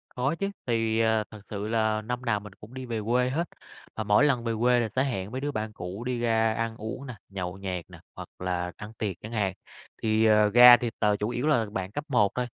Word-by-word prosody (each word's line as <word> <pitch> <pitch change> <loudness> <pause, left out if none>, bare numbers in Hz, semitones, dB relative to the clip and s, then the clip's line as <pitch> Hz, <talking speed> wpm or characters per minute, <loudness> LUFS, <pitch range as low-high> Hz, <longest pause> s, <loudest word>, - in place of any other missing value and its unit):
Có 130 +5 0
chứ, 195 0 0 0.2
thì, 115 -2 +1
à, 110 -1 +2
thật 110 - -11
sự 105 0 -4
là 110 -1 +1
năm 125 +3 -4
nào 105 -4 +1
mình 105 -1 -11
cũng 105 +5 -14
đi 130 -1 -6
về 115 -2 -3
quê 125 +2 +2
hết, 165 +6 -1 0.5
mà 110 - -2
mỗi 105 +6 +4
lần 130 -5 +2
về 115 - 0
quê 125 0 +4
là 115 - 0
sẽ 130 - +3
hẹn 100 -8 -3
mấy 130 - -3
đứa 145 +1 -2
bạn 110 -2 -3
cũ 95 +3 -7
đi 125 -1 -1
ra 115 -1 +2
ăn 115 0 -2
uống 110 +6 -6
nè, 125 - -7
nhậu 95 -1 -5
nhẹt 90 -3 -4
nè, - - -12
hoặc - - -8
là 90 -1 -2
ăn 105 +1 -9
tiệc 100 -5 -2
chẳng 110 - -8
hạn, 100 -4 0 0.5
thì, 110 0 +2
à, 105 -1 +5
ra 120 0 +11
thì 120 0 -3
t - - +1 0.2
chủ 105 - 0
yếu 120 +3 -2
là 120 -8 +3
bạn 95 -1 -4
cấp 145 - -4
1 105 -8 +3
thôi, 125 0 -1
110 Hz, 255 wpm, -27 LUFS, 105-125 Hz, 0.5 s, ra